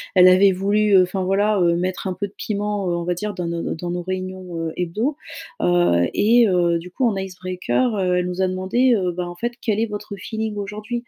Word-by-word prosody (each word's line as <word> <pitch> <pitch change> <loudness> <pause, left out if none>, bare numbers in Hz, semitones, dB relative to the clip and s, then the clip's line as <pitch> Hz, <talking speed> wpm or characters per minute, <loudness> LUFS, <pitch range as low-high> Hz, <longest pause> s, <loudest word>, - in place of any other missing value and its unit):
elle 180 0 +8
avait 190 +1 +5
voulu, 205 +2 +1
heu, 185 - +8
enfin, 185 +1 -3
voilà, 205 +2 +2
heu, 170 -1 +3
mettre 185 +2 -2
un 185 - -1
peu 200 +2 -4
de 200 - -21
piment, 205 -2 -2
heu, 170 - 0
on 170 - -3
va 175 +1 0
dire, 210 +4 -4
dans 180 -2 -4
nos 170 0 -3
nos - - -3
dans 175 +2 -5
nos 175 0 -3
réunions, 185 -1 -5
heu, 165 -1 -3
hebdo. 215 - -1 0.4
Heu 175 - +3
et, 230 +2 +4
heu, 175 -2 +2
du 180 +1 -11
coup, 260 - -3
en 210 -4 +1
icebreaker, 185 +5 -2
heu, 180 -2 +1
elle 180 - -1
nous 180 +1 -3
a 190 - +3
demandé, 190 +8 +1
heu, 180 -3 0
ben, 175 0 -4
en 175 - -8
fait: 240 +6 -2
«Quel 215 -1 0
est - - +2
votre 205 -1 -6
feeling 220 +2 -4
aujourd'hui?», 210 +3 -6
185 Hz, 245 wpm, -21 LUFS, 180-210 Hz, 0.4 s, elle